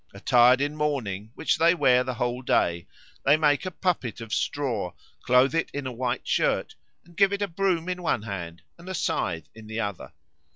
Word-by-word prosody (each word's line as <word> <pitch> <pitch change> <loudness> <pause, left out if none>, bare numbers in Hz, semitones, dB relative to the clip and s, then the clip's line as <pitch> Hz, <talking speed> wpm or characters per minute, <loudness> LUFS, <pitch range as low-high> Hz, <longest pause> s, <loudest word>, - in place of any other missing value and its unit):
Attired 125 +4 +5
in 145 +1 -1
mourning, 120 -10 -2
which - - 0
they 170 +2 +5
wear 125 -5 +4
the 130 -1 -4
whole 120 +1 -2
day, 85 -8 +1 0.4
they 145 +3 +5
make 150 +3 +2
a - - 0
puppet 175 - -2
of 115 -2 -7
straw, 120 -11 -1 0.3
clothe 125 +3 +4
it 165 - 0
in 140 -1 -3
a 130 - -3
white 125 0 -3
shirt, - - +1 0.3
and 170 0 -19
give 195 +1 +4
it 200 0 -1
a - - 0
broom 175 -1 0
in 180 0 -3
one 165 -11 0
hand 90 -6 -6 0.2
and 175 +2 -10
a 190 - -3
scythe 80 - -2
in 110 -1 -13
the 110 +1 -4
other. 100 -4 -4
130 Hz, 200 wpm, -26 LUFS, 110-165 Hz, 0.4 s, Attired